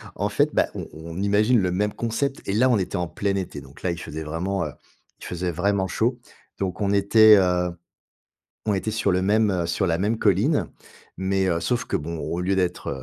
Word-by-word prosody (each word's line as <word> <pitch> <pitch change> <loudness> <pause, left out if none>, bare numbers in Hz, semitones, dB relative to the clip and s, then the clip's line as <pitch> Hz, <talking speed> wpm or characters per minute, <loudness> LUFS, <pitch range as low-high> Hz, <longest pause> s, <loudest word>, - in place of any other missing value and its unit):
en - - -1
fait, - - +2
bah, - - +3
on - - -5
on 80 +3 -7
imagine 105 +4 +3
le 90 -2 0
même 105 +3 0
concept 125 +4 -2
et 95 - 0
là 125 +5 +4
on 120 - +4
était 95 0 -3
en 90 -1 -1
plein 100 +5 -2
été, 90 -7 -4
donc 70 +1 -15
là 90 - +1
il 85 - -4
faisait 80 -1 -6
vraiment, 85 +5 -2
heu, - - -5 0.5
il - - -10
faisait 90 0 -3
vraiment 95 +3 0
chaud. 120 +6 0 0.4
Donc 95 +1 -3
on 100 -1 +1
était, 105 +2 +6
heu, 90 -2 +2 1.0
on 105 - +2
était 100 +3 -2
sur 110 -2 +1
le 90 0 +2
même, 105 +2 +3
heu 90 -3 -1
sur 90 +3 0
la 85 -1 +1
même 105 +4 0
colline, 110 - +2 0.5
Mais, 95 0 0
heu, 85 -2 +1
sauf 120 +6 -1
que - - 0
bon, 80 +2 -5
au 85 +3 -3
lieu 95 +2 +1
d'être, 90 -2 -1
95 Hz, 220 wpm, -24 LUFS, 90-105 Hz, 1.0 s, était